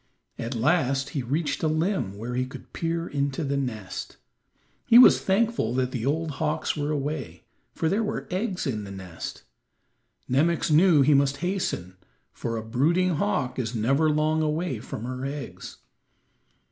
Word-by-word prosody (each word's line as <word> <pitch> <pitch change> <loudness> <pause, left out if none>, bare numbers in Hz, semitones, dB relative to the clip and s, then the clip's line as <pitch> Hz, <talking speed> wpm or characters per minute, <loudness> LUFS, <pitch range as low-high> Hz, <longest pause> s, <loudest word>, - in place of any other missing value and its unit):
At 120 +3 -3
last 135 +4 +1
he 140 - -2
reached 145 +6 -1
a 160 - +2
limb 155 - 0
where 115 +4 -5
he 130 +1 -1
could 130 - -12
peer 165 0 -2
into 140 +1 -1
the 140 -1 -1
nest. 110 -8 -4 0.7
He 230 - +8
was 250 - +8
thankful 195 - +1
that 130 -1 0
the 125 0 -3
old 160 +2 0
hawks 155 0 0
were 145 -1 -2
away, 145 - -3 0.3
for 160 - 0
there 200 +7 +1
were 215 -1 -3
eggs 185 0 -2
in 110 -7 -2
the 100 - -8
nest. 95 -4 -7 0.8
Nemox 160 +5 +2
knew 155 -2 +6
he 150 +2 +5
must 140 0 +3
hasten, 95 - -2 0.4
for 115 -1 -3
a 110 - -4
brooding 165 +9 +2
hawk 125 +4 -1
is 120 -1 -2
never 135 +8 +2
long 155 +1 +2
away 155 -4 -1
from 110 -1 -7
her 125 +1 -5
eggs. 140 +1 -6
140 Hz, 160 wpm, -26 LUFS, 125-160 Hz, 0.8 s, He